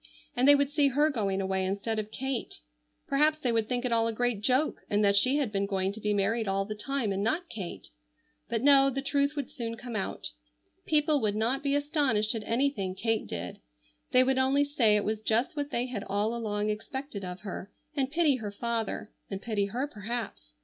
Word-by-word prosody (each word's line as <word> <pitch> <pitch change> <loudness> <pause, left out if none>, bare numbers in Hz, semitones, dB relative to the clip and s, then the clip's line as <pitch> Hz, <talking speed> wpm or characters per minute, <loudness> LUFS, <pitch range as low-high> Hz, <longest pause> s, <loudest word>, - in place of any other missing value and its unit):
And 255 +2 +3
they 285 - +9
would 285 0 +1
see 290 -1 +3
her 295 +4 +3
going 200 -6 -1
away 190 0 0
instead 200 +4 -1
of 215 0 -4
Kate. 265 +1 -3 0.5
Perhaps 300 +3 +3
they 260 -6 0
would 225 -1 0
think 250 0 -1
it 250 - -1
all 230 0 +3
a - - 0
great 240 -2 0
joke 260 +7 +1
and 205 0 +2
that 200 0 +4
she 255 +8 +4
had 275 -7 0
been 200 -1 0
going 190 -1 0
to 215 - -9
be 210 - 0
married 210 +2 +1
all 195 0 0
the 215 - -4
time 235 +1 -2
and 195 0 -1
not 320 - 0
Kate. 190 -6 -7 0.6
But 230 0 -1
no; 275 -1 +7
the 270 +1 -3
truth 280 +1 +1
would 285 -4 -4
soon 230 -1 -5
come 245 -2 -7
out. 195 - -3 0.6
People 300 -2 +3
would 210 -2 +1
not 235 +6 +1
be 280 0 +1
astonished 285 -8 +2
at 225 - -3
anything 230 -6 0
Kate 225 +1 -1
did. 90 0 -5 0.5
They 255 - +5
would 260 0 +2
only 270 +2 +3
say 260 -7 +3
it 210 - +2
was 215 0 -1
just 225 +6 +1
what 290 -1 -2
they 240 -2 -1
had 240 -6 -4
all 205 +3 0
along 215 -2 -1
expected 220 0 -5
of 180 0 -6
her, 200 -1 -6 0.3
and 270 -3 0
pity 305 -3 +3
her 210 -4 -5
father, 225 0 -3 0.2
and 195 - -4
pity 210 -2 -1
her 240 +7 -2
perhaps. 220 - -6
230 Hz, 215 wpm, -29 LUFS, 205-275 Hz, 0.6 s, they